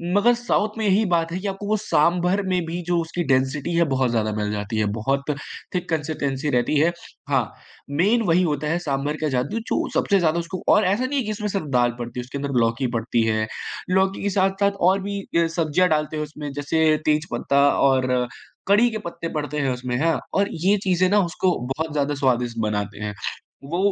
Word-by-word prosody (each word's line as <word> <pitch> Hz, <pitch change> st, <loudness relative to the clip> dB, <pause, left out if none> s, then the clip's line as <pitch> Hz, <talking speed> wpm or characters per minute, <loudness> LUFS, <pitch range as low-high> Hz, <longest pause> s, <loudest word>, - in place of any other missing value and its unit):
मगर 225 Hz, +4 st, +5 dB
साउथ 215 Hz, -2 st, 0 dB
में 220 Hz, -, -1 dB
यही 200 Hz, +2 st, +4 dB
बात 165 Hz, -1 st, +1 dB
है 180 Hz, -, -3 dB
कि 200 Hz, -, -4 dB
आपको 195 Hz, +1 st, -4 dB
वो 215 Hz, +1 st, +2 dB
सांभर 180 Hz, -1 st, +2 dB
में 180 Hz, -2 st, +1 dB
भी 170 Hz, +2 st, -4 dB
जो 175 Hz, -1 st, +2 dB
उसकी 165 Hz, +2 st, -3 dB
डेंसिटी 135 Hz, +5 st, +1 dB
है 170 Hz, -, +4 dB
बहुत 130 Hz, -2 st, +1 dB
ज़्यादा 110 Hz, -2 st, 0 dB
मिल 105 Hz, 0 st, -1 dB
जाती 105 Hz, +2 st, -3 dB
है। 105 Hz, -, +2 dB
बहुत 135 Hz, +5 st, 0 dB, 0.5 s
थिक 180 Hz, 0 st, -2 dB
कंसिस्टेंसी 150 Hz, -3 st, -2 dB
रहती 125 Hz, +2 st, +1 dB
है। 165 Hz, +3 st, +4 dB, 0.4 s
हाँ, -, -, +3 dB, 0.5 s
मेन 195 Hz, +11 st, +2 dB
वही 175 Hz, +2 st, +4 dB
होता 150 Hz, -3 st, -1 dB
है 165 Hz, +3 st, +1 dB
सांभर 145 Hz, -2 st, -2 dB
का 155 Hz, -, +1 dB
जादू 160 Hz, -, -1 dB
जो -, -, 0 dB
सबसे 200 Hz, -1 st, +3 dB
ज़्यादा 170 Hz, -1 st, +2 dB
उसको 170 Hz, +2 st, -5 dB
और 210 Hz, -, +3 dB
ऐसा 200 Hz, +7 st, +1 dB
नहीं 280 Hz, +2 st, 0 dB
है -, -, -1 dB
कि 215 Hz, -, -2 dB
इसमें 210 Hz, 0 st, -3 dB
सिर्फ 195 Hz, -4 st, -2 dB
दाल 120 Hz, 0 st, +3 dB
पड़ती 120 Hz, +1 st, -5 dB
है। -, -, -1 dB
उसके 130 Hz, +3 st, -7 dB
अंदर 140 Hz, -2 st, -1 dB
लौकी 115 Hz, +3 st, +1 dB
पड़ती 115 Hz, 0 st, +1 dB
है, 110 Hz, -1 st, 0 dB, 0.4 s
लौकी 190 Hz, +1 st, +1 dB
के 200 Hz, -, +1 dB
साथ-साथ 195 Hz, +1 st, +2 dB, 0.2 s
और 195 Hz, +1 st, +2 dB
भी 200 Hz, +1 st, -3 dB
अ, 170 Hz, -3 st, +1 dB
सब्जियाँ 170 Hz, +2 st, +2 dB
डालते 155 Hz, 0 st, 0 dB
हैं। 150 Hz, -, -1 dB
उसमें 150 Hz, -1 st, -7 dB
जैसे 145 Hz, +3 st, 0 dB, 0.2 s
तेज 150 Hz, 0 st, +2 dB
पत्ता 140 Hz, 0 st, +2 dB, 0.2 s
और 130 Hz, -2 st, +1 dB, 0.4 s
कढ़ी 210 Hz, +5 st, +5 dB
के 220 Hz, -, -4 dB
पत्ते 170 Hz, -1 st, -5 dB
पड़ते 150 Hz, -1 st, -3 dB
हैं 135 Hz, -2 st, +1 dB
उसमें 125 Hz, 0 st, -3 dB
हाँ, 165 Hz, 0 st, +2 dB
और 200 Hz, +1 st, +2 dB, 0.2 s
ये 205 Hz, +2 st, +5 dB
चीज़ें 185 Hz, -1 st, +2 dB
ना 205 Hz, +2 st, +4 dB
उसको 180 Hz, +1 st, 0 dB, 0.2 s
बहुत 160 Hz, 0 st, -3 dB
ज़्यादा 145 Hz, 0 st, 0 dB
स्वादिष्ट 125 Hz, -4 st, 0 dB
बनाते 105 Hz, -1 st, -3 dB
हैं। 105 Hz, 0 st, -3 dB, 0.6 s
वो 170 Hz, -, 0 dB
160 Hz, 215 wpm, -23 LUFS, 135-190 Hz, 0.6 s, मगर